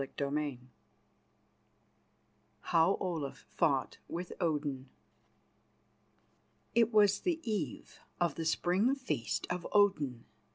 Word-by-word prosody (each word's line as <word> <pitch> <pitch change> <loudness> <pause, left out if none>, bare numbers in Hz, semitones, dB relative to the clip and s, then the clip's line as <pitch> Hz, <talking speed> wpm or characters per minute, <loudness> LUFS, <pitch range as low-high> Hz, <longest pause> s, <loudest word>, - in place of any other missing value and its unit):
CHAPTER 140 +1 -4
VI 145 -4 -2 2.0
HOW 165 +4 +3
OLAF 160 -7 -3
FOUGHT - - +1
WITH 175 +1 -5
ODIN 145 -5 -1 1.8
It 230 0 +4
was 205 -2 +5
the 345 -3 0
eve 200 - -4 0.2
of 175 -4 +2
the 165 - -4
Spring 185 +10 +2
Feast 150 - -2
of 180 -1 -3
Odin. 150 - +2
170 Hz, 95 wpm, -33 LUFS, 145-205 Hz, 2.0 s, was